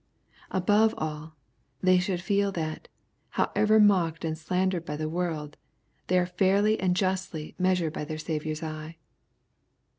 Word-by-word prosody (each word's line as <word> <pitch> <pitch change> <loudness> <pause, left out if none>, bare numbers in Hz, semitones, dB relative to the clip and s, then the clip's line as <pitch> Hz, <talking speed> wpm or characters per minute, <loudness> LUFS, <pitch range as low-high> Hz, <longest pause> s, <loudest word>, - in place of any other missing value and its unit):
Above 210 +4 +3
aU, 155 0 -4 0.5
they 185 0 +5
should 180 0 -1
feel 200 +2 +1
that, 160 -4 -4 0.5
however 215 +1 +3
mocked 180 -6 +3
and 160 -1 -1
slandered 180 +2 -1
by 150 -3 -5
the 155 0 -2
world, 160 -3 -3 0.5
they 185 - +3
are 180 - +3
fairly 195 +4 +2
and 180 -1 +1
justly 185 -4 -2
measured 180 -4 +1
by - - -4
their 155 +1 -5
Saviour's 155 0 -3
eye. 155 +1 -6
180 Hz, 140 wpm, -27 LUFS, 155-190 Hz, 0.5 s, they